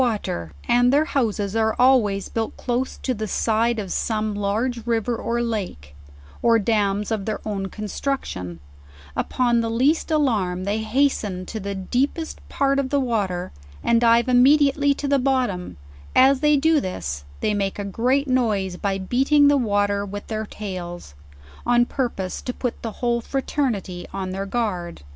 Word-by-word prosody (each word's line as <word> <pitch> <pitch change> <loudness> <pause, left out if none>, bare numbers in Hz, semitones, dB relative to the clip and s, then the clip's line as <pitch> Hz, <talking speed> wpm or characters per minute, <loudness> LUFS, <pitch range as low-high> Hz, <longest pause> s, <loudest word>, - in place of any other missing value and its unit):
69 250 - +4
water, 85 - -4
and 245 +1 +4
their 295 +3 +4
houses 220 - -1
are 220 -1 +2
always 240 -6 +3
built 225 -1 -3
close 250 +1 -2
to 255 - -2
the 215 -2 -4
side 225 +3 +1
of 200 -4 -3
some 215 -1 -1
large 220 +4 -2
river 230 0 0
or 235 +1 -1
lake, 185 - -4 0.5
or 230 -1 +5
dams 205 -1 0
of 210 -3 -1
their 215 - -2
own 195 -2 -2
construction, 195 - -4 0.6
upon 240 -2 +1
the 230 - -2
least 265 +10 +2
alarm 215 - +1
they 205 +3 -1
hasten 220 -5 0
to 220 - -5
the 200 0 -4
deepest 270 - -2
part 275 0 +1
of 265 -1 -1
the 285 - +2
water, 200 -8 -1 0.3
and 230 0 +3
dive 235 +1 +4
immediately 280 +3 +4
to 285 - -3
the 280 0 +3
bottom; 250 -9 -1 0.4
as 265 +1 +6
they 300 0 +4
do 320 +2 +3
this 75 - -4 0.2
they 210 - +1
make 195 -1 -1
a 205 - -4
great 255 +8 +1
noise 210 -8 0
by 195 0 -1
beating 270 +9 +3
the 290 - +4
water 205 -4 +1
with 205 0 -6
their 220 -1 -4
tails; 175 - -7 0.5
on 240 0 +3
purpose 235 -9 -3
to 250 - -3
put 245 -2 -4
the 225 - -4
whole 235 0 +2
fraternity 235 -9 -2
on 190 -1 -4
their 195 +1 -4
guard. 185 - -3
225 Hz, 165 wpm, -23 LUFS, 200-255 Hz, 0.6 s, as